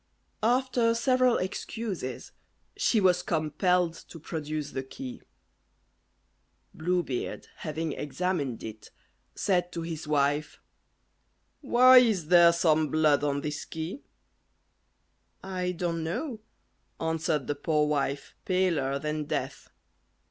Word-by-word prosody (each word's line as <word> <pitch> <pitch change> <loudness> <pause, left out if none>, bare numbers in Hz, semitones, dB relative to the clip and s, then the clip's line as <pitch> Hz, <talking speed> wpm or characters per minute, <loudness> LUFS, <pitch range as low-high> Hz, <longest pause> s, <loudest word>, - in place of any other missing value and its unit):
After 240 0 +2
several 255 0 +3
excuses, 190 - -4 0.4
she 225 - +2
was 180 -2 +3
compelled 165 +2 +1
to 165 0 -12
produce 155 -1 -4
the 130 - -3
key. 250 - -8 1.5
Blue 175 +2 0
Beard 130 -5 -4
having 160 0 -3
examined 150 -4 -2
it, 110 -1 -9 0.5
said 180 -2 0
to 165 - -4
his 165 -2 -6
wife, 145 0 0 1.0
"Why 255 -1 +7
is 205 -10 +1
there 175 -1 +8
some 160 -2 +2
blood 150 -1 +3
on 140 -1 0
this 150 0 -4
key?" 160 - -6 1.4
"I 185 -1 -2
don't 170 -2 -2
know," 220 - -3 0.6
answered 160 -3 -1
the 145 - -1
poor 150 +1 +1
wife, 140 -1 -2
paler 170 -8 +1
than 150 +1 -3
death. - - -4
165 Hz, 110 wpm, -28 LUFS, 150-185 Hz, 1.5 s, there